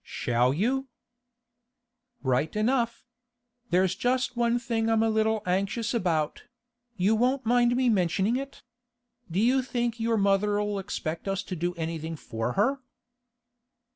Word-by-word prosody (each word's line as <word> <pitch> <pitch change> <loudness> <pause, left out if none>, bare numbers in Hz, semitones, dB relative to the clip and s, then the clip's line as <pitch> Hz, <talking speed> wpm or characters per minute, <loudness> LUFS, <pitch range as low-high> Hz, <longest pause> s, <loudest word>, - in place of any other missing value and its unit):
'Shall 120 +1 0
you?' 255 - 0 1.4
'Right 130 +6 0
enough. 235 +2 0 0.6
There's 185 +1 +3
just 250 +2 0
one 235 0 +2
thing 230 -2 -1
I'm 225 0 +3
a 225 - +2
little 220 0 +1
anxious 200 +6 -1
about; 165 -9 -1 0.5
you 195 +4 +3
won't 255 +4 +1
mind 240 +1 +3
me 255 0 +2
mentioning 195 +1 +2
it? 275 +1 -6 0.7
Do 170 +3 -1
you 250 +5 +3
think 240 -2 -2
your 225 0 +1
mother'll 205 +1 +1
expect 170 -3 -4
us 195 0 -1
to 185 - -5
do 175 +1 -2
anything 165 -1 -4
for 115 -6 -4
her? 250 +8 +1
215 Hz, 135 wpm, -27 LUFS, 180-240 Hz, 1.4 s, There's